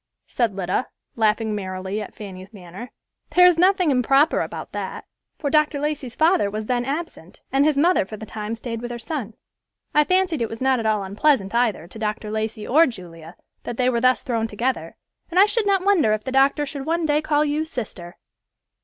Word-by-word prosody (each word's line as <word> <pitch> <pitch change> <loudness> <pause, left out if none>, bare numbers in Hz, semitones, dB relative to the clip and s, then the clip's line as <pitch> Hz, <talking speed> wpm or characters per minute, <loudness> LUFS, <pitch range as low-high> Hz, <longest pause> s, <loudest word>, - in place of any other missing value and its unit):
said 230 -5 -1
Lida, 185 +5 -1 0.3
laughing 220 0 +1
merrily 190 0 -4
at 205 - -9
Fanny's 190 -1 -9
manner. 190 +6 -10 0.5
"There 360 0 +8
is 355 -2 +5
nothing 365 -3 +4
improper 270 +4 +3
about - - -6
that, - - -5 0.3
for 285 -3 -2
Dr. 305 -1 +2
Lacey's 290 -4 -3
father 325 - +3
was 215 +1 -4
then 245 +1 -1
absent, 280 - -6
and 270 +2 +3
his 300 -1 +2
mother, 345 +5 +4
for 215 +3 -9
the 220 - -8
time, 215 +1 -5
stayed 230 0 -6
with 240 - -5
her 240 - -5
son. 230 -3 -5 0.6
I 300 - +5
fancied 365 -4 +1
it 230 - -1
was 225 - -7
not 265 -1 +2
at 225 - -1
all 210 -2 +1
unpleasant 205 +1 +1
either 235 -8 +1
to 185 +6 -12
Dr. 215 0 -3
Lacey 220 0 -3
or 320 +6 +5
Julia, 170 -7 -10 0.3
that 240 - -6
they 255 0 +2
were 235 -1 0
thus 255 +1 +3
thrown 230 -4 -1
together, 235 +5 -3 0.3
and 360 +1 +1
I 395 - +8
should 425 0 0
not 390 -2 +2
wonder 345 - +4
if 215 0 -2
the 260 - -4
doctor 275 +2 +3
should 280 0 -7
one 335 0 0
day 300 0 +2
call 300 -1 +1
you 300 +1 0
sister!" 215 - -7
245 Hz, 205 wpm, -22 LUFS, 215-300 Hz, 0.6 s, There